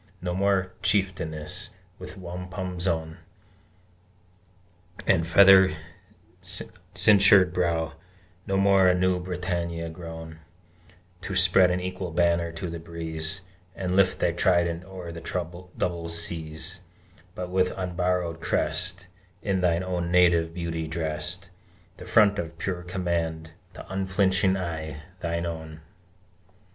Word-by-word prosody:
No 90 0 -3
more 100 +1 +3
a 95 0 -6
Chieftainess, 90 -3 -1 0.3
with 90 +2 -9
wampum 90 0 -6
zone 80 -2 -1 1.9
And 85 -3 +3
feather 95 0 +7 0.7
cinctured 100 -3 +3
brow, 85 -4 0 0.5
No 95 - +1
more 95 -1 +5
a 90 - +5
new 90 0 +2
Britannia, 85 -2 -3
grown 80 -1 -9 0.8
To 95 - -4
spread 90 0 +6
an 90 0 0
equal 90 0 -4
banner 85 0 +1
to 85 +2 -5
the 85 0 -5
breeze, 80 +2 -3 0.3
And 90 -1 -2
lift 95 -1 +4
thy 85 - +2
trident 85 0 +1
o'er 90 -3 -8
the 85 +1 -5
double 85 -2 -2
seas; 85 +1 -5 0.6
But 90 0 -5
with 90 0 +2
unborrowed 90 -2 -1
crest, 90 +6 -1 0.4
In 95 -2 0
thine 85 0 +2
own 90 -2 -2
native 85 -2 +4
beauty 85 -2 -3
dressed, 80 +3 -3 0.5
The - - -10
front 105 -1 +5
of 85 -3 -5
pure 90 0 -3
command, 85 -3 -2 0.2
the - - -10
unflinching 95 0 +2
eye, 80 -4 -5 0.2
thine 85 0 -1
own! 80 -2 -6
90 Hz, 120 wpm, -26 LUFS, 85-95 Hz, 1.9 s, feather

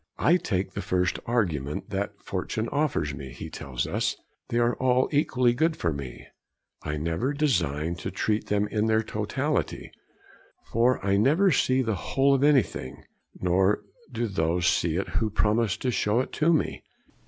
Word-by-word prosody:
'I 170 +3 +4
take 95 - -2
the - - -4
first 90 0 0
argument 85 - -1
that 100 +1 -3
fortune 105 +4 -3
offers 140 - 0
me,' 70 -1 -7
he - - -8
tells 65 -3 -4
us; - - -1 0.3
'they 120 - -1
are 120 0 +2
all 130 0 +2
equally 130 -4 +2
good 160 +6 +1
for 85 -2 0
me; 70 -3 -7 0.6
I 75 0 -3
never 85 - -1
design 85 - 0
to 80 - -4
treat 105 0 -1
them 105 0 +1
in 105 0 0
their 110 0 +2
totality, 130 +8 -2 0.8
for 120 +3 +3
I 100 0 +3
never 155 - +4
see 130 -2 +2
the 110 -2 0
whole 135 +8 +1
of 135 0 +2
anything, 120 - +1 0.4
nor 95 +3 +2 0.3
do 120 - -1
those 85 -4 0
see 85 -2 +2
it 95 - -2
who 110 - 0
promise 105 0 +1
to 125 - -1
show 105 +1 +1
it 130 - -2
to 155 +3 +2
me.... 160 - 0
105 Hz, 165 wpm, -26 LUFS, 90-130 Hz, 0.8 s, I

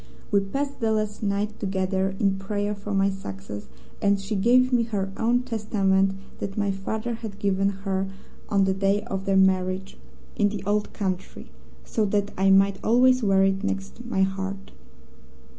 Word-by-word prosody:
We 200 - +5
passed 275 +9 -3
the 225 -2 +1
last 215 -1 -1
night 205 +1 -1
together 190 -1 -1
in 195 -2 +1
prayer 205 +1 -2
for 205 0 -7
my 195 0 +2
success, 100 - -7 0.3
and 200 0 +3
she 195 +2 -3
gave 250 +5 +4
me 240 - +4
her 195 -4 -2
own 240 +2 +2
Testament 200 -5 +1 0.3
that 195 +1 -5
my 205 -1 +1
father 215 +4 -3
had 220 -3 -7
given 195 -1 +1 0.2
her 190 0 0 0.4
on 200 -2 +3
the 190 0 +2
day 195 +2 +1
of 195 -4 -4
their 195 -1 +2
marriage 190 0 +1 0.4
in 205 -1 +3
the 200 -2 -5
Old 205 +1 0
Country, 190 -3 -4 0.3
so 220 - 0
that 205 0 0
I 195 +1 +3
might 195 0 +4
always 255 +3 +4
wear 195 -3 +4
it 195 +1 +1
next 200 +4 -3
my 230 -5 +1
heart. 195 +1 -3
200 Hz, 170 wpm, -25 LUFS, 195-215 Hz, 0.4 s, We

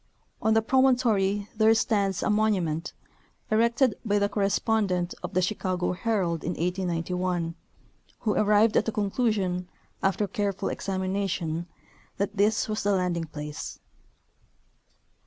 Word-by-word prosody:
On 220 0 +3
the 225 - +3
promontory 225 -6 +2
there 220 +1 +5
stands 200 -4 +1
a - - +1
monument, 185 -7 0 0.6
erected 235 +2 +3
by 205 -3 +1
the 200 0 +2
correspondent 200 -3 0
of - - -6
the 185 - +3
Chicago 185 -2 -1
Herald 180 -5 -1
in 175 - -2
1891, 180 -1 -1 0.7
who 215 -3 +1
arrived 210 +1 +4
at - - +3
the 225 - -1
conclusion, 200 -4 0 0.3
after 195 +2 +1
careful 200 -3 -2
examination, 185 -4 -2 0.5
that 200 +1 -2
this 210 +2 +2
was 215 -1 -2
the 205 0 +2
landing 180 -3 0
place. 150 -1 -7
200 Hz, 120 wpm, -27 LUFS, 180-215 Hz, 0.7 s, there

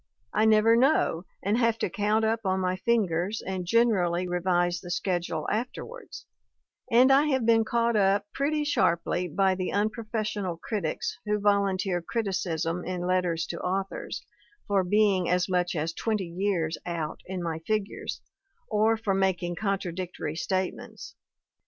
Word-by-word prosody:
I 215 - +3
never 220 +1 +5
know, 235 - +2 0.2
and 210 +4 +1
have 230 -2 +2
to - - 0
count 210 +4 +1
up 225 +1 +1
on 190 -1 +1
my 185 0 0
fingers, 195 -2 0
and 185 -2 -4
gen 230 +4 +4
erally 180 -3 0
revise 175 -1 +1
the 175 - -9
schedule 175 -3 -2
afterwards; 260 - -5 0.7
and 250 +3 +6
I 280 +3 +5
have 265 -5 +1
been 225 -1 +5
caugh^up 220 -4 +2
pretty 295 +2 0
sharply 175 - +1
by 190 +3 +2
the 185 0 -3
unprofessional 215 -3 -2
critics 170 -3 -3
who 210 0 +1
volunteer 195 -3 +1
criticism 175 -4 -2
in 180 -1 -3
letters 180 -2 +1
to 170 - -4
authors, 190 +1 -3 0.4
for 200 -2 +2
being 195 -1 +2
as 180 +1 +2
much 180 -1 0
as 160 +1 -1
twenty 215 -2 -1
years 180 -4 0
out 165 -3 -4
in 185 -1 -4
my 165 -1 -3
figures, 210 +4 -3 0.5
or 220 +1 +3
for 220 -3 -1
mak 190 -2 +1
ing 175 0 -2
contradictory 180 -4 -3
statements. 185 +2 -3
190 Hz, 145 wpm, -27 LUFS, 175-220 Hz, 0.7 s, and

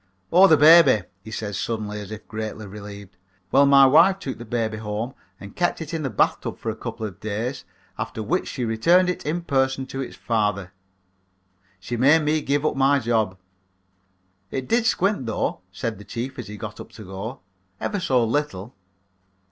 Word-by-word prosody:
"Oh, 190 +3 +8
the 155 - +6
baby," 150 - +7 0.2
he - - -10
said 110 -1 -5
suddenly, 105 -2 -3
as 100 - -9
if 110 0 -9
greatly 110 -1 -5
relieved, 100 -2 -10 0.3
"well, 140 +1 +5
my 140 -1 +7
wife 165 +8 +6
took 135 -11 -6
the 120 - -8
baby 110 -1 -2
home 110 +4 -4 0.3
and 100 0 -11
kept 175 -1 0
it 160 -1 -7
in 165 - -2
the 140 - -2
bathtub 105 - 0
for 110 - -3
a - - -7
couple 115 -1 -6
of 95 -5 -8
days 110 +5 -4 0.3
after 110 - -4
which 175 - -1
she 125 - -3
returned 170 +12 +3
it 180 - -7
in 170 +3 -1
person 135 -3 0
to 135 +1 -5
its 130 - -6
father. 105 -5 -1 1.1
She 120 +6 -5
made 145 +6 +5
me 155 +1 +1
give 145 +1 0
up - - +1
my 135 +1 +4
job. 110 -6 0 1.1
It 130 +3 -4
did 230 0 +2
squint, 190 - +1
though," 110 - -2
said 110 +2 -4
the - - -10
chief, 130 +5 -6
as 120 - -6
he 105 +1 -8
got - - -7
up - - -10
to 110 - -10
go, 100 +7 -7 0.4
"ever 205 - -2
so 130 -10 +2
little." 115 -4 -2
120 Hz, 190 wpm, -23 LUFS, 105-145 Hz, 1.1 s, Oh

